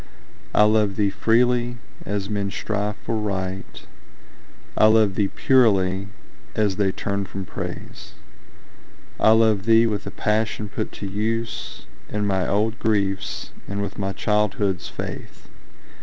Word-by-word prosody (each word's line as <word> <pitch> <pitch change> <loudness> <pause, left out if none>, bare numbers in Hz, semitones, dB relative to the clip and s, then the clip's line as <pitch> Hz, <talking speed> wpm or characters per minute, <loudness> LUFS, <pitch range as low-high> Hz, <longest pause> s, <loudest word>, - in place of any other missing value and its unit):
I 105 - +7
love 105 -2 +3
thee 100 -1 +1
freely, 120 +3 +2 0.3
as 100 -1 -2
men 100 -1 -1
strive 105 0 -2
for 115 - -3
Right; 95 -3 -4 0.9
I 110 - +6
love 110 -2 +4
thee 100 +1 +1
purely, 100 -7 +3 0.5
as 105 -3 +1
they 100 -2 +2
turn 100 +1 -2
from 95 0 -6
Praise. - - -7 1.1
I - - +5
love 110 -3 +3
thee 115 0 +6
with 105 -3 -2
the - - -4
passion 105 -1 -1
put - - -4
to 100 - -6
use 110 +3 -3 0.2
In 105 0 -1
my 95 -2 +1
old 110 +3 0
griefs, 100 -3 -1 0.2
and 100 +1 -3
with 100 0 -6
my 95 -1 -1
childhood's 105 -2 0
faith. - - -8
105 Hz, 135 wpm, -23 LUFS, 100-110 Hz, 1.1 s, I